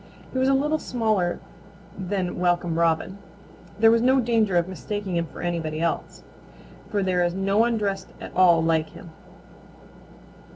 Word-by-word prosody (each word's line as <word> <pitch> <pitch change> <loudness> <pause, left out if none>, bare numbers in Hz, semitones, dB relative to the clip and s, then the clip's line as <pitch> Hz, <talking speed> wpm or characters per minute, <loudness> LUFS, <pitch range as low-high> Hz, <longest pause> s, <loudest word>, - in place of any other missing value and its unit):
He 260 - -1
was 260 +1 +2
a 270 - +4
little 300 +3 +1
smaller 215 -10 -1 0.6
than 190 -2 -3
Welcome 175 -2 0
Robin. 170 +4 0 0.6
There 225 +1 +6
was 230 0 +3
no 260 +2 +4
danger 225 -6 +2
of 170 0 +1
mistaking 195 0 -5
him 170 -1 -1
for - - -10
anybody 165 -3 -2
else, 165 0 -3 0.7
for 205 -2 0
there 180 -1 +1
is 175 0 -1
no 195 +2 +1
one 230 0 +3
dressed 195 -2 -2
at - - -8
all 175 -3 +5
like 160 -1 +1
him. 170 - -12
190 Hz, 160 wpm, -24 LUFS, 175-220 Hz, 0.7 s, There